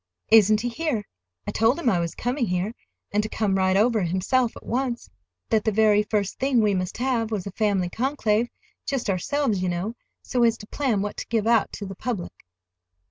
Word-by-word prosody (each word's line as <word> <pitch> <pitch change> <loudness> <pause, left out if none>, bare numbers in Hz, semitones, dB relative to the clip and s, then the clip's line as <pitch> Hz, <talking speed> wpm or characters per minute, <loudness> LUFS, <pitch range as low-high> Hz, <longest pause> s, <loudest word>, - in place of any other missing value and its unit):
"Isn't 215 -1 +6
he 245 - -1
here? 260 -4 -2 0.4
I - - -3
told 225 +4 +2
him 340 - -3
I 190 -7 +3
was 170 -1 -3
coming 245 0 -1
here, 180 +5 -1 0.4
and 210 - +2
to 215 - -4
come 205 -4 0
right 190 0 +3
over 220 +1 +3
himself 190 +8 +1
at - - -13
once; 240 - -2 0.4
that 220 -2 +3
the 220 - +1
very 210 0 +4
first 210 -2 -2
thing 265 -2 +2
we 210 -2 +3
must 185 -1 -2
have 240 -3 0
was 210 -5 -3
a 200 - -5
family 200 -3 +1
conclave, 230 0 0 0.4
just 265 -7 0
ourselves, 215 +2 0
you 185 - 0
know, 180 +6 -2 0.3
so 250 - -1
as 230 -1 +4
to 210 - -11
plan 225 -4 0
what 210 - -5
to - - -5
give 220 -2 0
out 230 -2 +3
to 205 - -5
the 195 - -6
public." 205 -3 -4
220 Hz, 205 wpm, -24 LUFS, 195-240 Hz, 0.4 s, Isn't